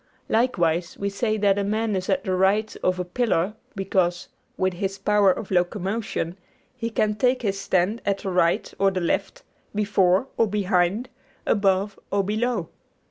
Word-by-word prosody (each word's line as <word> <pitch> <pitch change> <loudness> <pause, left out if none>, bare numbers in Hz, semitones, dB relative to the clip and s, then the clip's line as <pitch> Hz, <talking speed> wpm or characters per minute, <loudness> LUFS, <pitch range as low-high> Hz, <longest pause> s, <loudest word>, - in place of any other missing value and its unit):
Likewise, 175 -8 +1
we 200 - -1
say 215 +2 0
that 200 -1 +3
a - - 0
man 215 +1 0
is 185 +1 -3
at 190 -1 +1
the 190 -3 -1
right 200 +4 +2
of 185 0 +1
a 180 - -1
pillar 190 -1 0 0.2
because, 185 -3 0 0.3
with 185 0 +1
his 195 +2 -3
power 205 -2 +4
of 200 +2 -5
locomotion, 185 0 -1 0.4
he 230 -2 -3
can 215 -2 +1
take 250 +3 +1
his 195 -2 -1
stand 190 +6 +1
at 200 -1 0
the 195 - -4
right 170 -2 +1
or 195 0 +4
the 190 -1 -2
left, 340 - -2 0.3
before 200 0 +2
or 225 - +3
behind, 195 +2 +1 0.4
above 200 -1 +1
or 200 0 +1
below. 215 -2 -1
195 Hz, 165 wpm, -24 LUFS, 185-215 Hz, 0.4 s, power